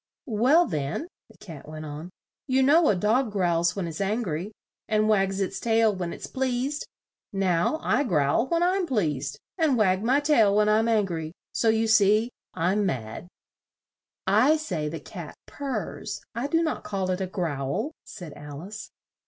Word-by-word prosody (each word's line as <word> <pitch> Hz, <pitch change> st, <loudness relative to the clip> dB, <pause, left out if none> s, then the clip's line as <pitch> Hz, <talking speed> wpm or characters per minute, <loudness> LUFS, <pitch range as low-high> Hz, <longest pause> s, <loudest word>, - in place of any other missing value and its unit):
"Well, 265 Hz, +8 st, +4 dB
then," 155 Hz, -, -3 dB, 0.2 s
the -, -, -19 dB
Cat 160 Hz, -7 st, -11 dB
went 155 Hz, 0 st, -7 dB
on, 150 Hz, +3 st, -7 dB, 0.4 s
"you 265 Hz, 0 st, +3 dB
know 305 Hz, +4 st, +5 dB
a 210 Hz, -, +3 dB
dog 220 Hz, +6 st, +1 dB
growls 175 Hz, -3 st, +1 dB
when 190 Hz, -4 st, -2 dB
it's 165 Hz, +3 st, -5 dB
angry, 195 Hz, -3 st, -2 dB, 0.4 s
and 215 Hz, 0 st, +2 dB
wags 195 Hz, -2 st, +2 dB
its 195 Hz, -, -2 dB
tail 225 Hz, -2 st, +3 dB
when 175 Hz, -2 st, -3 dB
it's -, -, -7 dB
pleased. 265 Hz, +3 st, -2 dB, 0.4 s
Now 190 Hz, -, +1 dB
I 250 Hz, +6 st, +2 dB
growl 155 Hz, -, +2 dB
when 335 Hz, +2 st, +1 dB
I'm 365 Hz, 0 st, +1 dB
pleased, 150 Hz, -, -1 dB, 0.2 s
and 305 Hz, -6 st, +3 dB
wag 190 Hz, -3 st, +3 dB
my 260 Hz, +5 st, +3 dB
tail 235 Hz, -9 st, +4 dB
when 210 Hz, 0 st, +4 dB
I'm 215 Hz, +2 st, +3 dB
an 220 Hz, -3 st, +3 dB
gry. 160 Hz, -3 st, -5 dB, 0.2 s
So 230 Hz, -, +1 dB
you 220 Hz, 0 st, +2 dB
see, 220 Hz, +1 st, +4 dB, 0.2 s
I'm 185 Hz, +5 st, +1 dB
mad." 125 Hz, -, -3 dB, 1.0 s
"I 225 Hz, +11 st, +4 dB
say 175 Hz, -, -3 dB
the 165 Hz, +1 st, -5 dB
cat 165 Hz, +1 st, -9 dB
purrs; 280 Hz, -2 st, -4 dB
I 240 Hz, +4 st, -2 dB
do 330 Hz, +3 st, +2 dB
not 315 Hz, -, -2 dB
call 190 Hz, -2 st, -2 dB
it 185 Hz, +1 st, -2 dB
a 190 Hz, -, -1 dB
growl," 175 Hz, -, -2 dB
said 175 Hz, -8 st, -9 dB
Al 145 Hz, 0 st, -9 dB
ice. 210 Hz, +3 st, -8 dB
205 Hz, 170 wpm, -26 LUFS, 170-245 Hz, 1.0 s, know